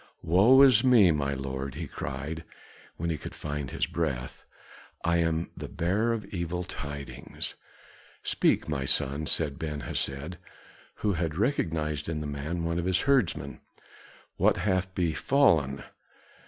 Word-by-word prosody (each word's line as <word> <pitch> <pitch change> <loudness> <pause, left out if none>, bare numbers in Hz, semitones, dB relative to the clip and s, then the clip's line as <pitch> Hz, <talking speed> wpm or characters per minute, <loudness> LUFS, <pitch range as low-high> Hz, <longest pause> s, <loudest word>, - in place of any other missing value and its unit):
"Woe 110 +11 +6
is 125 -5 +7
me, 115 -9 +6
my 70 -2 0
lord," 65 0 -4
he 80 +2 -4
cried, 70 +4 -5 0.5
when 85 +1 -1
he 80 - -3
could - - -8
find 75 -2 -4
his - - -1
breath, 65 -1 -3 0.6
"I 85 0 +3
am 80 0 0
the - - -6
bearer 100 +8 0
of 115 -3 -2
evil 90 0 -2
tidings." 70 -4 -6 0.7
"Speak, - - +2
my 70 - -1
son," 70 +3 0
said 70 -3 0
Ben 75 -2 -3
Hesed, 70 +8 -4 0.7
who 105 - +3
had 80 -3 -2
recognized 80 - -1
in 80 -2 -2
the 75 - -4
man 75 +4 -3
one 85 +1 -1
of 85 - -2
his 95 0 +2
herdsmen. 100 - +1 0.8
"What - - +3
hath 95 -2 0
befallen?" 85 - +2
80 Hz, 140 wpm, -28 LUFS, 70-95 Hz, 0.8 s, is